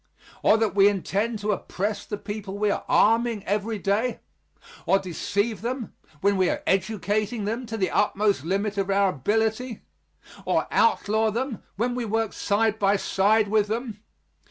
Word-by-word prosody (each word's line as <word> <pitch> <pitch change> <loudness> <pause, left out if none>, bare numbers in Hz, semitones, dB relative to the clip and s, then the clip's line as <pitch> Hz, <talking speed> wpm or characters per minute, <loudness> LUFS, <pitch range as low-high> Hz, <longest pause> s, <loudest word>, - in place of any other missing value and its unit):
Or 215 - +5
that 225 -2 0
we 200 0 +6
intend 205 +3 0
to 210 +1 0
oppress 205 +1 -3
the 205 - -4
people 205 -1 -6
we 210 0 +1
are - - -2
arming 230 -1 +3
every 210 +2 -1
day? 205 +5 -1 0.7
Or 195 - +5
deceive 200 +4 -2
them, 240 -1 -4 0.3
when 200 0 +2
we 185 -1 +3
are - - -2
educating 205 +2 0
them 230 +4 -3
to 225 0 -4
the 190 -3 0
utmost 205 -6 +1
limit 200 +4 -1
of 195 0 -1
our 195 0 +3
ability? 220 - -1 0.6
Or - - +1
outlaw 220 - +2
them, 240 +2 -3
when 240 +5 0
we 245 -1 -2
work 225 0 -1
side 220 +1 0
by 200 0 +3
side 205 +2 +2
with 210 0 +2
them? 225 -1 -4
210 Hz, 160 wpm, -25 LUFS, 200-225 Hz, 0.7 s, we